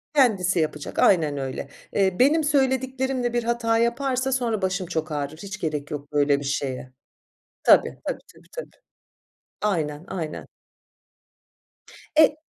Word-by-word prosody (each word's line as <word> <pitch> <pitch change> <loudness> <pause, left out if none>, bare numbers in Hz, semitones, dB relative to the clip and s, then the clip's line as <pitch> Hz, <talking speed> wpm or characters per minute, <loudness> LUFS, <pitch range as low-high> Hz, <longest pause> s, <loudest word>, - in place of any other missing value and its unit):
Kendisi 195 - +3
yapacak. 150 -2 -2
Aynen 155 -7 +4
öyle. 135 -1 -4 0.3
Eee 190 -2 +1
benim 300 +5 +5
söylediklerimle 265 -3 +1
bir 240 -1 +1
hata 230 -1 +1
yaparsa 255 +3 +1
sonra 235 -5 0
başım 190 -1 -1
çok 160 -2 -3
ağrır. 145 +1 -3
Hiç 200 +4 -7
gerek 150 -4 -3
yok 145 0 -6
böyle 145 -1 +3
bir 145 - -7
şeye. 130 -2 -3 0.7
Tabii, - - +5
tabii, - - -2 0.2
tabii, - - -20
tabii. - - -8 0.8
Aynen, 160 -7 -1
aynen. 165 -5 -5 1.7
E 305 -1 +6
195 Hz, 130 wpm, -24 LUFS, 150-255 Hz, 1.7 s, E